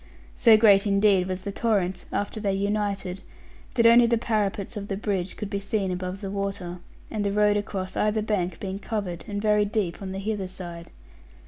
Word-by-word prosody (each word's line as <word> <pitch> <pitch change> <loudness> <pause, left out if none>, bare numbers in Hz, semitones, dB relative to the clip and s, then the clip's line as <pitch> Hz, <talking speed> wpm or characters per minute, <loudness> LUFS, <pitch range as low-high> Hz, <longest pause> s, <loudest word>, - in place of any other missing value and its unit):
So 225 -3 +6
great 210 -2 +5
indeed 200 -2 +3
was 185 0 -4
the 200 - -3
torrent, 195 -4 0
after 205 +2 -2
they 200 -2 0
united, 200 -2 -2 0.5
that 235 -2 +3
only 235 +1 +7
the 235 0 +2
parapets 210 -2 -1
of 200 -1 -5
the 195 - -3
bridge 195 -3 -2
could 210 - -4
be 200 - -1
seen 200 -2 -1
above 185 +2 -4
the 195 -2 -4
water, 195 -3 -4 0.3
the 205 -2 -1
road 210 0 +3
across 195 -2 -3
either 215 0 +1
bank 185 -5 -1
being 195 0 -4
covered 200 -6 -4
and 205 -1 -3
very 210 0 +3
deep 205 -4 -2
on 190 -1 -5
the 190 - -5
hither 200 -1 -2
side. 175 -2 -8
200 Hz, 190 wpm, -26 LUFS, 190-210 Hz, 0.5 s, only